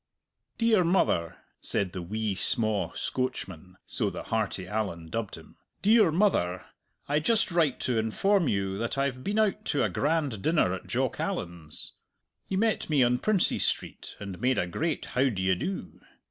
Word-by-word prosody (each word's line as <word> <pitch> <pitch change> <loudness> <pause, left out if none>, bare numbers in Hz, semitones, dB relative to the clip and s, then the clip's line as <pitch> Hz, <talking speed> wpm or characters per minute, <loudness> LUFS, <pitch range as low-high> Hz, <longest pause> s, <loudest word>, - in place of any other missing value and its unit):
"Dear 225 -5 +4
mother," 165 - +1 0.2
said 95 -3 +1
the 90 - -5
wee 105 +4 -2
sma' 110 +1 0
Scoatchman 95 -9 -4
so - - -1
the - - -6
hearty 95 - -1
Allan 95 -6 -3
dubbed 115 -1 -3
him - - -15 0.3
"dear 210 -4 +5
mother, 155 - +1 0.4
I 145 +1 +2
just 225 +5 +2
write 160 -6 +2
to 120 -3 +1
inform 175 - +2
you 100 -2 -1
that 115 +3 -2
I've 135 -2 -1
been 205 +2 -1
out 215 -2 +2
to 145 - +1
a - - +2
grand 145 -8 0
dinner 155 - +2
at 95 - -6
Jock - - -1
Allan's. 85 -3 -4 0.5
He 190 - -1
met 220 -3 +1
me 145 -4 +4
on 125 0 +2
Princes 215 -4 +2
Street, - - -2
and 100 -3 -7
made 130 +1 +2
a - - +1
great 150 - -2
how 130 +2 +3
d'ye 95 -4 +1
do. 185 - -4
125 Hz, 165 wpm, -28 LUFS, -, 0.5 s, dear